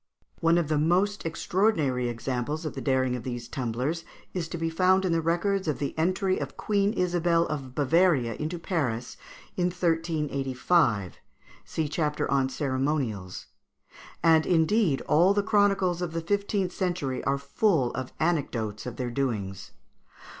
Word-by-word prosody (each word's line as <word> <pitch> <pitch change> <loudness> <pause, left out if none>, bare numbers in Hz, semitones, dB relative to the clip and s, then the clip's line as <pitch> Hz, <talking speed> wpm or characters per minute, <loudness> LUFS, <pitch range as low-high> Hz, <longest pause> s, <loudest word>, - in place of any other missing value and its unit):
] - - -45
One 165 +1 +3
of 170 -3 +1
the 155 -1 +1
most 180 +5 +1
extraordinary 160 - +1
examples 130 +6 -3
of 155 - -3
the - - -6
daring 130 -2 +1
of 125 - -5
these 120 -1 -5
tumblers 130 +7 -2 0.3
is 175 -3 -2
to 170 - -5
be 165 0 -2
found 185 +3 +3
in 180 - +1
the 165 0 +2
records 175 +3 0
of 150 -4 0
the 140 - -3
entry 185 +3 +1
of - - -6
Queen 200 -1 +1
Isabel 175 -3 +2
of 135 -5 -5
Bavaria 145 -4 +3
into 155 +9 -4
Paris, 135 - -2 0.4
in 180 - +1
1385 155 - 0 0.5
(see 160 -2 -2
chapter 150 -1 -1
on 135 -1 +2
Ceremonials); 130 - -2 0.8
and, 160 -1 +5
indeed, 170 -2 +2
all 180 +6 +4
the 205 - +2
chronicles 195 -4 +2
of 175 -2 -3
the 165 - -2
fifteenth 200 +1 0
century 175 -9 -2
are 140 0 +2
full 140 - +1
of 130 -1 -5
anecdotes 125 -10 -1
of 120 - -5
their 125 -2 -3
doings. 105 -7 -3
160 Hz, 155 wpm, -27 LUFS, 130-180 Hz, 0.8 s, and